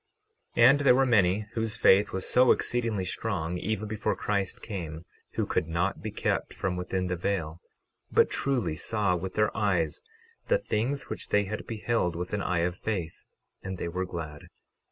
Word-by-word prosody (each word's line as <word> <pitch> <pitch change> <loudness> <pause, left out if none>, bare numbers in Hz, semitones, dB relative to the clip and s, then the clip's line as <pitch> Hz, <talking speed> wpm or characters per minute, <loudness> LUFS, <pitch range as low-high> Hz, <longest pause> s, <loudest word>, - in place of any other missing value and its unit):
12:19 115 - +6
And 140 +2 +6
there 140 -3 +5
were 135 +1 +4
many 105 -4 +3
whose 115 0 -1
faith 100 -1 +5
was 95 - -2
so 125 0 +5
exceedingly 115 -5 0
strong, 90 -3 -2
even 110 +2 -2
before 105 0 -1
Christ 100 -3 -2
came, 85 -6 -6 0.3
who - - 0
could 80 - 0
not 85 +4 -1
be 110 - -4
kept 105 - -2
from 95 -1 -2
within 90 +1 -2
the 90 0 -1
veil, 85 -2 -2 0.5
but - - +5
truly 130 - -1
saw 100 +1 0
with 95 +2 -5
their 105 -1 +2
eyes 95 -7 0 0.5
the - - +4
things 135 - -1
which - - -6
they 105 - +3
had 105 +2 -5
beheld 110 -5 0
with 90 +3 -4
an 105 - 0
eye 90 -3 0
of 90 +1 0
faith, 95 -6 -4 0.4
and 95 0 -5
they - - -3
were 90 +2 -2
glad. 80 -4 -7
100 Hz, 180 wpm, -28 LUFS, 90-110 Hz, 0.5 s, 12:19